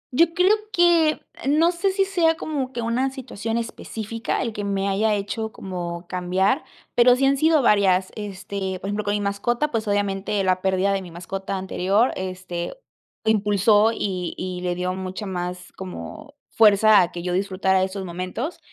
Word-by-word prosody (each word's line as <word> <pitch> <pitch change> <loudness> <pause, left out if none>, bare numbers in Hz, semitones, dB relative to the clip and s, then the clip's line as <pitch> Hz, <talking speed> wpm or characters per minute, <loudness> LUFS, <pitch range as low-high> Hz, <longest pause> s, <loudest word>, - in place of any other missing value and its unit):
Yo 335 +3 +5
creo 370 +3 +5 0.2
que 340 -4 +4 0.3
no 325 +4 +4
sé 370 +3 0
si 390 0 +1
sea 340 -4 +2
como 280 -5 -3
que 240 -3 -4
una 245 +4 0
situación 230 -4 -4
específica 230 0 -4
el 230 -3 -3
que 205 - -4
me 200 -1 -1
haya 210 +2 +2
hecho 205 +2 -3
como 175 -3 -6
cambiar, 185 - 0 0.3
pero 245 +1 +6
sí 270 +2 +1
han 275 +1 +4
sido 310 0 +3
varias, 190 -4 +3
este, 200 -2 -5
por 195 - -5
ejemplo, 205 +1 -2
con 205 - +1
mi 205 - -1
mascota, 235 +8 -1
pues 220 -4 -2
obviamente 205 0 0
la 185 -1 +1
pérdida 190 +1 +1
de 195 - -1
mi 180 - -9
mascota 190 +3 -5
anterior, 190 +4 +1
este, 185 -2 -5 0.5
lo 220 - +4
impulsó 210 +1 +3
y 185 -5 -3
y 180 -1 -4
le 180 -1 -1
dio 180 +1 -2
mucha 190 +2 -5
más 180 -1 -5
como 180 - -9 0.2
fuerza 215 -1 +6
a 175 -1 0
que 175 0 -6
yo 180 - -2
disfrutara 190 0 +1
de 190 - +2
esos 190 0 -5
momentos, 185 - -4
200 Hz, 180 wpm, -23 LUFS, 185-235 Hz, 0.5 s, pero